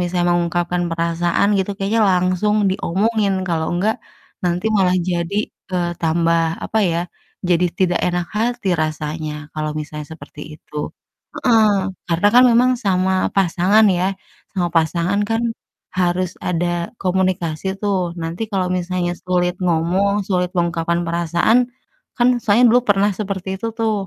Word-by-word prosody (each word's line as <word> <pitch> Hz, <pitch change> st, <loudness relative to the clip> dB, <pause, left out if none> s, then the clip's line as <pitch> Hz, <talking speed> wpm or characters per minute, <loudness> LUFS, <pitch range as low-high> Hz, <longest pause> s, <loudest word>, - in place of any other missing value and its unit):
misalnya 175 Hz, 0 st, 0 dB
mengungkapkan 175 Hz, 0 st, 0 dB
perasaan 170 Hz, +3 st, +1 dB
gitu 190 Hz, +1 st, -1 dB
kayaknya 205 Hz, +3 st, 0 dB
langsung 185 Hz, +3 st, +1 dB, 0.2 s
diomongin, 200 Hz, +3 st, 0 dB, 0.2 s
kalau 160 Hz, -2 st, 0 dB
enggak 210 Hz, +5 st, +1 dB, 0.5 s
nanti 175 Hz, +3 st, 0 dB
malah 185 Hz, -2 st, +3 dB
jadi, 175 Hz, +2 st, -1 dB, 0.4 s
eee, 175 Hz, -1 st, 0 dB
tambah, 165 Hz, 0 st, +2 dB, 0.2 s
apa 220 Hz, -, -1 dB
ya, 165 Hz, -, 0 dB, 0.5 s
jadi 175 Hz, 0 st, +3 dB
tidak 180 Hz, -2 st, +2 dB
enak 175 Hz, -1 st, -1 dB
hati 230 Hz, -2 st, -1 dB
rasanya 155 Hz, 0 st, -3 dB, 0.2 s
kalau 155 Hz, 0 st, -3 dB
misalnya 150 Hz, 0 st, -6 dB
seperti 155 Hz, -1 st, -11 dB, 0.2 s
itu. 150 Hz, -, -24 dB, 0.7 s
Heeh, 225 Hz, -4 st, +4 dB, 0.4 s
karena 170 Hz, +4 st, +3 dB
kan 250 Hz, +1 st, +8 dB
memang 245 Hz, +2 st, +4 dB
sama 190 Hz, -1 st, +1 dB, 0.2 s
pasangan 195 Hz, +3 st, +3 dB
ya, 180 Hz, -, 0 dB, 0.5 s
sama 180 Hz, -3 st, 0 dB
pasangan 170 Hz, +4 st, +1 dB
kan 225 Hz, 0 st, +1 dB, 0.6 s
harus 180 Hz, 0 st, +1 dB, 0.2 s
ada 175 Hz, 0 st, 0 dB, 0.3 s
komunikasi 185 Hz, -3 st, -1 dB, 0.2 s
tuh, 205 Hz, -2 st, +1 dB, 0.2 s
nanti 165 Hz, +4 st, -5 dB
kalau 190 Hz, -2 st, 0 dB
misalnya 180 Hz, 0 st, -2 dB
sulit 180 Hz, -1 st, +1 dB
ngomong, 180 Hz, +4 st, +1 dB
sulit 180 Hz, -2 st, 0 dB
mengungkapkan 170 Hz, 0 st, 0 dB
perasaan 170 Hz, +6 st, +2 dB, 0.6 s
kan 240 Hz, 0 st, +4 dB, 0.2 s
saya 215 Hz, +3 st, +4 dB
dulu 245 Hz, +2 st, +5 dB
pernah 200 Hz, 0 st, +4 dB
seperti 195 Hz, -2 st, -4 dB
itu 230 Hz, -, -4 dB
tuh, 225 Hz, -1 st, +1 dB
180 Hz, 135 wpm, -19 LUFS, 170-200 Hz, 0.7 s, kan